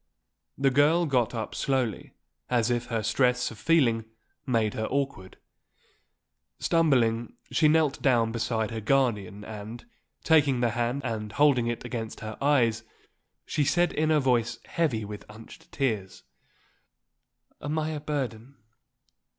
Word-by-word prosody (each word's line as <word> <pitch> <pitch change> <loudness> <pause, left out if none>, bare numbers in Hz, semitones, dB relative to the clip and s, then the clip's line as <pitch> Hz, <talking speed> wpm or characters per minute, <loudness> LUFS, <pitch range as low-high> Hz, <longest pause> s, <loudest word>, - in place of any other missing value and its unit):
The 135 0 +2
girl 150 +6 +4
got 125 -6 +1
up 110 -2 -4
slowly, 130 -7 -1 0.4
as 120 -1 +2
if 120 0 -1
her 115 -2 -2
stress 125 +2 +1
of 110 - -12
feeling 120 -9 +2 0.4
made 115 -4 +1
her 110 - -2
awkward. 135 -9 -3 1.2
Stumbling, 125 -9 +2 0.2
she 155 - +4
knelt 150 -2 +2
down 120 -4 +3
beside 115 -1 -1
her 110 -1 -4
guardian 105 -5 0
and, 110 +2 -8 0.4
taking 145 -5 +4
the 120 -1 +1
hand 120 +4 -1
and 110 -3 -3
holding 140 -5 +3
it 120 -1 -3
against 115 -3 -5
her 110 0 -6
eyes, 120 -6 +3 0.6
she 150 - 0
said 165 +5 +2
in 155 +1 +1
a 155 -1 +4
voice 125 -4 +1
heavy 130 -11 -1
with 105 0 -8
unshed 110 +1 -14
tears: 110 -9 -2 1.4
"Am 150 +2 -3
I 155 0 -1
a 155 -1 -3
burden? 135 -4 -4
120 Hz, 135 wpm, -27 LUFS, 110-145 Hz, 1.4 s, girl